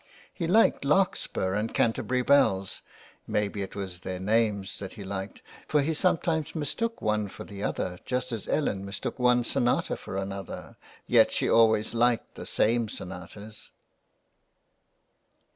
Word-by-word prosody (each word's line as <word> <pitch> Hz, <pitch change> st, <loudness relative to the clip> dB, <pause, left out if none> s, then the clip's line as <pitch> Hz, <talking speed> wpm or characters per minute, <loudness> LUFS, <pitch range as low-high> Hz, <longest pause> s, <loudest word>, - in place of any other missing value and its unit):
He 170 Hz, -, -3 dB
liked 215 Hz, -1 st, +4 dB
Larkspur 145 Hz, -, +1 dB
and 105 Hz, +3 st, -2 dB
Canterbury 125 Hz, +2 st, +1 dB
bells, 100 Hz, -9 st, +3 dB, 0.5 s
may 105 Hz, 0 st, +1 dB
be 100 Hz, 0 st, -5 dB
it 95 Hz, -, -6 dB
was 95 Hz, -3 st, -5 dB
their 90 Hz, 0 st, -5 dB
names 100 Hz, -1 st, 0 dB
that 95 Hz, -2 st, -7 dB
he 105 Hz, -, -8 dB
liked, 95 Hz, 0 st, -6 dB, 0.2 s
for 150 Hz, -2 st, +2 dB
he 160 Hz, +3 st, 0 dB
sometimes 165 Hz, -2 st, +1 dB
mistook 195 Hz, +10 st, -2 dB
one 105 Hz, -1 st, +1 dB
for -, -, -9 dB
the 100 Hz, -1 st, -9 dB
other 90 Hz, -3 st, -2 dB
just 125 Hz, 0 st, -2 dB
as 115 Hz, -4 st, -4 dB
Ellen 100 Hz, -10 st, 0 dB
mistook 100 Hz, +5 st, -5 dB
one 125 Hz, 0 st, +4 dB
sonata 120 Hz, +1 st, +1 dB
for 95 Hz, -, -7 dB
another, 95 Hz, -1 st, -6 dB, 0.3 s
yet -, -, +5 dB
she -, -, +1 dB
always 110 Hz, -1 st, +4 dB
liked 120 Hz, 0 st, +1 dB
the -, -, -8 dB
same 115 Hz, 0 st, +2 dB
sonatas. 95 Hz, +3 st, -9 dB
110 Hz, 145 wpm, -28 LUFS, 100-125 Hz, 0.5 s, yet